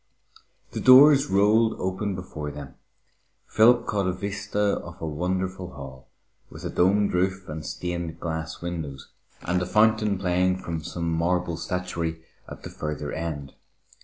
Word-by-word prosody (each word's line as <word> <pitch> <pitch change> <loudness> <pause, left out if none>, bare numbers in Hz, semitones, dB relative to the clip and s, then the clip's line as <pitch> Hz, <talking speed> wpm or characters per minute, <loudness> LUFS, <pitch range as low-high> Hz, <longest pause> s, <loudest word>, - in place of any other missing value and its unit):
The - - -4
doors 140 +2 +8
rolled 110 +3 +3
open 95 +2 -2
before 80 -5 -6
them. 70 -2 -9 0.7
Philip 120 +2 +5
caught 100 -2 0
a - - +2
vista 100 +2 -1
of 85 0 -11
a - - -4
wonderful 90 +3 -3
hall, 65 -1 -10 0.4
with - - -11
a - - -3
domed 100 +3 +2
roof 95 +1 0
and 75 0 -6
stained 85 +2 -4
glass 80 0 -5
windows, 75 -6 -5 0.3
and 90 +1 0
a - - -1
fountain 110 0 +3
playing 90 0 +1
from 85 -4 -5
some 85 +1 -4
marble 85 +1 0
statuary 85 -2 -3 0.3
at - - -10
the - - -8
further 75 -1 -4
end. 80 -4 -5
90 Hz, 145 wpm, -25 LUFS, 80-100 Hz, 0.7 s, doors